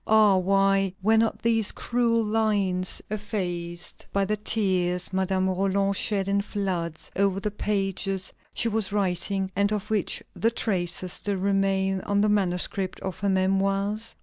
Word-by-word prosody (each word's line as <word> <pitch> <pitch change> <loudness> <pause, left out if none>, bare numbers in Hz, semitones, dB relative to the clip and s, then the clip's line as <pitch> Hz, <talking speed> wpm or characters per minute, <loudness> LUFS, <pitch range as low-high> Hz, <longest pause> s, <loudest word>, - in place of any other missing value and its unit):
Ah! 215 -2 +6
why 195 0 +2
were 220 +2 +4
not 225 0 0
these 225 -2 +3
cruel 235 -1 +1
lines 205 -4 0
effaced 175 -5 -4
by 200 0 +1
the 210 +2 0
tears 185 -4 0
Madame 190 0 +1
Roland 195 +1 +1
shed 195 -1 0
in 200 0 +2
floods 185 -6 -3
over 195 -1 +2
the 210 +1 -2
pages 195 -2 -2 0.2
she - - 0
was 220 -3 -1
writing, 195 -1 -1
and 200 +2 +2
of 210 0 -3
which 210 -3 0
the 230 - +2
traces 185 -5 -1
still 205 -1 -2
remain 195 0 +1
on 200 +1 +1
the 210 - +3
manuscript 190 -1 0
of 190 -3 -5
her 200 - 0
Memoirs? 195 +3 0
195 Hz, 150 wpm, -26 LUFS, 190-210 Hz, 0.2 s, Ah